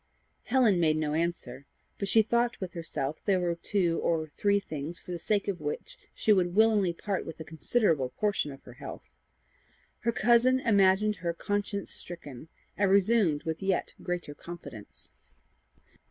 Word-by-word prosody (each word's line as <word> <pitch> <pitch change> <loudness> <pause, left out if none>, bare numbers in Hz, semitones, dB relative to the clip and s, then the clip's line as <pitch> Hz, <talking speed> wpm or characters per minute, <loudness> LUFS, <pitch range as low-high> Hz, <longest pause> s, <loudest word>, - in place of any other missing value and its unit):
Helen 235 -7 +3
made 155 -2 +3
no 150 -1 -1
answer, 150 -5 -3 0.3
but 200 - -2
she 220 +2 +5
thought 235 +2 0
with 185 -2 -5
herself 160 -4 -3
there 195 -3 +3
were 175 -1 0
two 170 0 0
or 160 -2 0
three 200 +6 +1
things 155 -2 -5
for - - -10
the 175 - -4
sake 200 +4 0
of 195 -3 -2
which - - -5 0.2
she 215 - +3
would 180 -2 +1
willingly 215 -4 +4
part 190 +3 -3
with 165 - -9
a - - -5
considerable 160 - 0
portion 200 -2 -1
of 135 - -12
her 125 - -12
health. 125 - -9 1.0
Her 235 - 0
cousin 240 +3 +4
imagined 205 -2 +3
her 170 -1 -3
conscience 205 +2 -2
stricken, 155 -5 -8 0.3
and 200 -1 +2
resumed 195 -6 +3
with 160 0 -3
yet 190 -2 0
greater 175 -4 -4
confidence. 145 -10 -10
180 Hz, 160 wpm, -29 LUFS, 160-210 Hz, 1.0 s, she